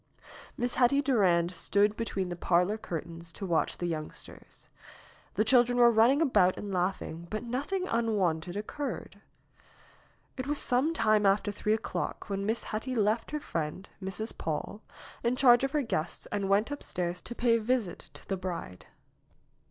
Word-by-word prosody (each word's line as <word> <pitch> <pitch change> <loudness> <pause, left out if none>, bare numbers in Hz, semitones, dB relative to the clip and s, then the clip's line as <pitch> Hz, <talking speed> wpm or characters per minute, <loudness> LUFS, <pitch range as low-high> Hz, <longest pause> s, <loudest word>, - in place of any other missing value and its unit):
Miss 245 0 -1
Hetty 255 +2 +4
Durand 180 -10 +3
stood 200 +4 +2
behind 195 -5 -3
the - - -3
parlor 180 +4 +2
curtains 170 -4 -6
to 200 - -6
watch 170 -3 0
the 175 - -3
youngsters. 155 -3 -7 0.7
The 215 - +2
children 245 +1 +4
were 240 -1 +7
running 240 +7 +5
about 205 - +3
and 205 -1 -5
laughing, 175 -2 -2
but 215 - -3
nothing 285 +11 -2
unwonted 195 -7 0
occurred. 275 +7 -5 1.2
It 255 +1 -4
was 295 0 0
some 260 +6 +2
time 215 -5 +3
after 205 +1 +2
three 210 +1 0
o'clock 220 - -4
when 195 0 -2
Miss 225 +2 0
Hetty 240 +4 -3
left 215 +1 +1
her 300 - -2
friend, 165 - -4 0.2
Mrs. 195 +4 -2
Paule, 165 +6 -4 0.4
in 240 +1 +1
charge 245 -1 +6
of 270 - +2
her 300 -2 +2
guests 170 -8 -3
and 200 -1 -1
went 205 +7 +2
upstairs 180 -10 -3
to 240 - -7
pay 235 -1 +3
a - - -4
visit 220 -6 -1
to - - -12
the 195 - -1
bride. 175 - -6
210 Hz, 160 wpm, -30 LUFS, 180-245 Hz, 1.2 s, were